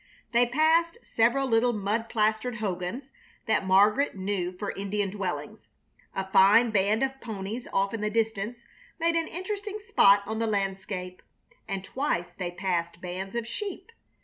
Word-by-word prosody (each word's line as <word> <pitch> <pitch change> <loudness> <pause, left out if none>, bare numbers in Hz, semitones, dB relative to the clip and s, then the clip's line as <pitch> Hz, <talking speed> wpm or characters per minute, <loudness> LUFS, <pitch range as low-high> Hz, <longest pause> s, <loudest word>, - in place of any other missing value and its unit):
They 240 +1 +4
passed 320 - +3
several 240 +4 +2
little 240 0 +3
mud 215 +2 -1
plastered 220 +2 0
hogans 210 +5 -4 0.3
that 220 -4 +1
Margaret 205 +9 +4
knew 190 -2 -2
for 195 +3 -4
Indian 200 0 -2
dwellings. 195 -3 -5 0.5
A 190 - -2
fine 215 +5 +6
band 210 +3 +2
of 270 0 -2
ponies 220 +1 -5
off 195 +1 +1
in 225 - -3
the 210 - 0
distance 225 +1 -2 0.3
made 335 +1 +2
an 330 -1 +1
interesting 405 +3 -4
spot 300 - +4
on 220 +1 -3
the 230 - 0
landscape, 195 -2 -3 0.5
and 195 -1 -3
twice 185 -8 -2
they 175 0 -4
passed 175 -2 -2
bands 185 +3 -6
of 235 -1 -1
sheep. 390 - -6
215 Hz, 150 wpm, -27 LUFS, 195-245 Hz, 0.5 s, fine